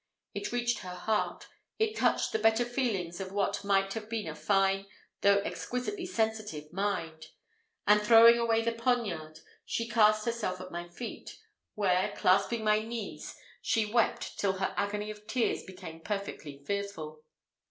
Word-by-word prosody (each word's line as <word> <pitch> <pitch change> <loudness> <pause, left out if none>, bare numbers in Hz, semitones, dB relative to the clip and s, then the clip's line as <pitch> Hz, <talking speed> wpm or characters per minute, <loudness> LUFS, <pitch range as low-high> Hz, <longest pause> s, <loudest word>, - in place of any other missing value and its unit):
It 410 - -4
reached 240 0 0
her 180 -1 -7
heart 215 +4 -1 0.3
it 440 0 +1
touched - - +2
the 220 - 0
better 225 +2 +3
feelings 215 -9 -2
of 190 -1 -5
what 200 0 -1
might 195 -1 +2
have 220 -1 -6
been 225 -2 -3
a - - -4
fine, 195 -1 +1 0.3
though 200 0 +5
exquisitely 355 - -4
sensitive, 215 - -2
mind; 175 -5 -2 0.6
and, 210 0 +5
throwing 230 +2 +8
away 230 -1 +2
the 230 - +1
poniard, 225 -10 -1 0.2
she 230 - -2
cast 215 -2 +4
herself 230 -6 -2
at 185 0 -8
my 175 0 -5
feet, 225 +6 -8 0.4
where, 185 -3 +1
clasping 200 +5 +3
my 215 0 +4
knees, 225 0 -6 0.3
she 225 -2 +1
wept 235 -2 +1
till 195 -2 +2
her 190 0 -2
agony 210 +1 -2
of 210 0 -13
tears 235 +1 0
became 165 -3 -9
perfectly 165 -7 -5
fearful. 165 -6 -4
210 Hz, 150 wpm, -30 LUFS, 185-230 Hz, 0.6 s, throwing